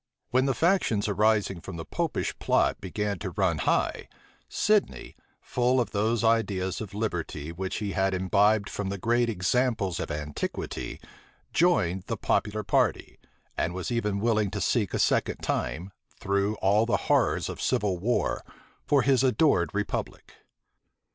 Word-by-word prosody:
When 130 +2 +3
the 135 - +1
factions 165 - +2
arising 105 -3 +1
from 95 - -8
the 80 - -6
Popish - - -2
plot - - +1
began 100 0 -3
to 95 - -4
run 90 -3 0
high, - - 0 0.4
Sidney, 210 -1 0 0.3
full 125 +1 +1
of 120 - -1
those 110 +3 0
ideas 100 -5 +1
of 100 -2 -7
liberty 85 -7 -3
which 95 +2 -4
he 105 -2 -3
had 95 0 +1
imbibed 100 +3 +2
from 100 -2 -4
the 100 - -3
great 120 +4 +1
examples 105 -1 0
of - - -4
antiquity, 75 -1 -4 0.5
joined 95 - +2
the - - -2
popular 105 +1 0
party; - - 0 0.4
and 85 - -1
was 95 +5 -4
even 105 -4 0
willing 110 -2 +1
to 105 - -4
seek 100 +1 0
a - - +1
second - - +1
time, 80 +11 -2 0.3
through 100 +2 0
all 105 +3 +2
the - - +2
horrors - - +2
of - - -6
civil 95 -4 0
war, 120 +7 0 0.4
for 140 -3 +4
his 135 -1 +3
adored 130 - +3
republic. 105 0 -4
105 Hz, 150 wpm, -27 LUFS, 95-115 Hz, 0.5 s, for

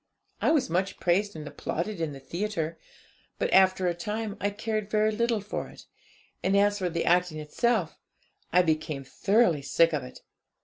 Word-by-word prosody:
I - - +3
was 310 -3 +3
much 185 +4 -1
praised 195 +3 +1
and 155 -2 -7
applauded 170 +5 -4
in 160 -2 -1
the 140 - -9
theatre; 165 +1 -3 0.6
but - - -1
after 185 -1 +5
a 175 - +2
time 210 +4 -4
I 205 - +1
cared 215 0 -3
very 215 0 +2
little 230 0 0
for 205 - -4
it; - - -14 0.6
and 195 +1 +2
as 205 +1 +3
for 180 -2 0
the 170 0 -2
acting 175 -2 +2
itself, 180 +4 0 0.5
I 180 +1 +5
became 155 -3 -1
thoroughly 185 - +2
sick 165 +4 +3
of - - 0
it. 65 - -11
185 Hz, 175 wpm, -27 LUFS, 165-210 Hz, 0.6 s, after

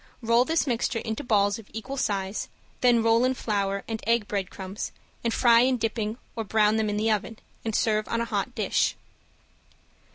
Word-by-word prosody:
Roll 230 +2 +4
this 325 +2 +1
mixture 240 -3 0
into 220 -1 -3
balls 205 -3 +2
of 215 - -14
equal 225 +5 -5
size, 200 -5 -2 0.3
then 240 -2 +4
roll 230 +1 +4
in 260 +1 +2
flour 200 -4 -1
and 225 -1 -4
egg 230 -2 +2
breadcrumbs, 195 0 -4 0.3
and 230 - +1
fry 235 0 +5
in 255 +1 +3
dripping 220 -1 -2 0.2
or 225 - -2
brown 215 +1 +3
them 220 -1 +1
in 210 - -1
the 220 +1 +2
oven, 215 +1 -2 0.3
and 225 -2 -2
serve 215 -1 +1
on 230 - -1
a 235 - 0
hot - - -2
dish. - - +1
225 Hz, 185 wpm, -26 LUFS, 210-235 Hz, 0.3 s, fry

